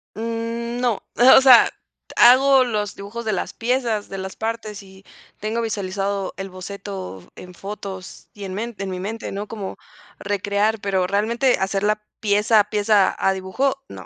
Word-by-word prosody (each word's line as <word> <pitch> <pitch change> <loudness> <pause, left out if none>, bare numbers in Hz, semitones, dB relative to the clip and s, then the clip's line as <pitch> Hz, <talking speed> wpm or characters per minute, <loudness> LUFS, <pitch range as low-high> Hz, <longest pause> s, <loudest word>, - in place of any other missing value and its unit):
Mm, 230 +1 -4
no. 240 -5 0 0.4
O - - +7
sea, 260 -3 +8 0.5
hago 260 +2 +6
los 210 -5 -2
dibujos 215 +4 -7
de 215 - 0
las 195 - -3
piezas, 230 -3 -1
de 195 - -6
las 190 0 -6
partes 220 -2 -5
y, 190 0 -16 0.4
tengo 220 +2 -2
visualizado 200 -2 -3
el 195 0 -5
boceto 185 - -8
en 180 0 -11
fotos 195 0 -8
y 205 - -10
en 190 - -5
men 230 +4 -4
en 195 -1 -4
mi 185 - -4
mente, 220 +4 -5
¿no? 200 +2 -5
Como, 205 -3 -6 0.4
recrear 205 +2 0
pero 190 -2 0
realmente 230 +6 +1
hacerla 205 +2 0 0.2
pieza 210 +1 +3
a 210 0 +1
pieza, 210 -1 +3
a 195 - +2
dibujo, 255 +9 -2
no. - - -10
210 Hz, 160 wpm, -22 LUFS, 195-230 Hz, 0.5 s, sea